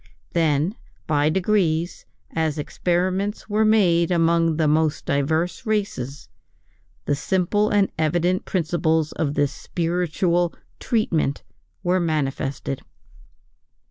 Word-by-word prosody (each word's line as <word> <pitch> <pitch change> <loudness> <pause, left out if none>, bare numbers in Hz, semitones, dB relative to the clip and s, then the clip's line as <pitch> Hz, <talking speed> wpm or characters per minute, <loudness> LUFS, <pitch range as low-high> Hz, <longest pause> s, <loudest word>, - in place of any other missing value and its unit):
Then 160 +1 +2 0.3
by 150 -1 +2
degrees, 175 -2 0 0.2
as 160 -2 -1
experiments 185 +6 -1
were 215 +1 +2
made 180 -6 +4
among 165 -2 +2
the 160 -2 +2
most 155 0 +1
diverse 160 - 0
races, 200 - -2 0.8
the - - +1
simple 190 +7 +1
and 205 -2 +2
evident 175 +4 +1
principles 160 -3 0
of 145 -2 -2
this 145 -1 +1
spiritual 175 +1 0 0.2
"treatment" 170 - 0 0.4
were 180 +1 +2
manifested. 140 -4 -2
170 Hz, 100 wpm, -23 LUFS, 155-185 Hz, 0.8 s, made